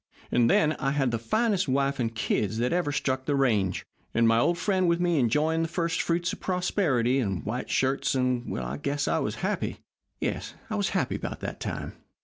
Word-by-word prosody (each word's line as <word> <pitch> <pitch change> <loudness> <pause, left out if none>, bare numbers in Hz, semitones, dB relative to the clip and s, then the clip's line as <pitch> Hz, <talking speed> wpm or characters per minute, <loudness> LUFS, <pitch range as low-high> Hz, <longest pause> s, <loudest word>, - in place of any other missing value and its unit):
And 120 -1 +4
then, 150 +4 +4
I 135 -1 0
had 135 -4 +1
the 115 - -1
finest 200 - +1
wife 140 +1 +1
and 115 -2 -1
kids 110 -1 0
that 120 +6 +1
ever 175 -4 +1
struck 130 -2 -1
the 145 - +1
range, 105 -9 +1 0.3
and 115 0 +4
my 115 0 +4
old 170 +8 +2
friend 185 -1 +1
with 170 0 +2
me 175 -3 +2
enjoying 150 +7 +2
the 165 - 0
first 170 +1 -1
fruits 170 +1 0
of - - -7
prosperity 155 - +1
and 95 -8 -2
white 120 +4 -3
shirts, 135 +1 +1
and 125 -2 0
I 65 +2 -4
guess 140 - -1
I - - +2
was - - -2
happy. - - -1 0.4
Yes, - - -3 0.2
I - - 0
was 200 -3 0
happy 140 -8 0
about - - -6
that - - -5
time." - - -4
135 Hz, 205 wpm, -27 LUFS, 120-170 Hz, 0.4 s, And